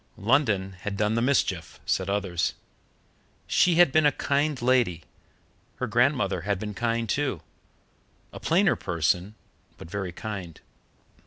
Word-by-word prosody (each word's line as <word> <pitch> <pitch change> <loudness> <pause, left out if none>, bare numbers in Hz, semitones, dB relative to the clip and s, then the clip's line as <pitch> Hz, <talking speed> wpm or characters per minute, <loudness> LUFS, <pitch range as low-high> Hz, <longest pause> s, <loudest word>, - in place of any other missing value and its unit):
London 105 -5 +1
had 100 -1 -4
done 105 +1 +1
the 115 - +1
mischief, 110 - 0
said 95 0 0
others. 95 -4 -1 0.9
She 175 -2 +3
had 175 -4 +6
been 155 +1 +4
a - - +4
kind 145 0 0
lady; 120 -10 +2 0.7
her - - -3
grandmother - - +1
had 100 +2 -1
been 105 +2 -5
kind, 115 +3 -1
too 130 - -1 0.9
a - - -8
plainer 185 +3 +3
person, 90 +3 -1 0.4
but 80 - -11
very 95 -2 -3
kind. 95 -4 -7
105 Hz, 135 wpm, -26 LUFS, 95-135 Hz, 0.9 s, had